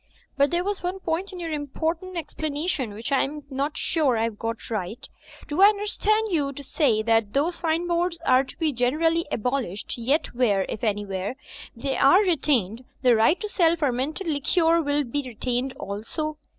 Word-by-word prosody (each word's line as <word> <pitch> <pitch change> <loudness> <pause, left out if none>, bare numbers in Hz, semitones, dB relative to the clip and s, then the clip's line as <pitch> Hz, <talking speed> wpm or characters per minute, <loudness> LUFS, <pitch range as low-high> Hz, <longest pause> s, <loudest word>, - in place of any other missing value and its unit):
"But 280 0 +3
there 345 +1 0
was 405 0 -2
one 360 +2 -2
point 355 +3 -2
in 365 - -8
your 335 -2 -4
important 320 +5 -3
explanation 300 - -3
which 230 +6 -5
I 275 - +4
am 295 +2 -3
not 280 +3 -2
sure 290 -8 +1
I 220 - +1
have 225 -2 -3
got 230 0 -4
right. 215 +1 -4 0.4
Do 300 +5 -1
I 400 - +10
under 415 -1 -2
stand 430 +1 +1
you 290 -5 +1
to 285 - -8
say 250 -6 +1
that, 225 -2 +2
though 290 +5 +2
sign 335 0 -1
boards 345 0 0
are 255 +1 +5
to 265 - -12
be 315 -3 0
generally 315 +7 +1
abolished, 240 -3 -2
yet 275 +7 0
where, 215 -6 +2
if 230 - -5
anywhere, 205 0 -2 0.4
they 265 +3 -2
are 320 +9 +6
retained, 260 - +1 0.2
the 250 -2 +6
right 225 +11 +4
to 425 - -2
sell 340 -5 +3
fermented 290 +3 -1
liquor 330 +2 +2
will 290 -1 +1
be 285 +3 -2
retained 250 +1 -2
also? 295 +5 -5
285 Hz, 185 wpm, -25 LUFS, 240-335 Hz, 0.4 s, I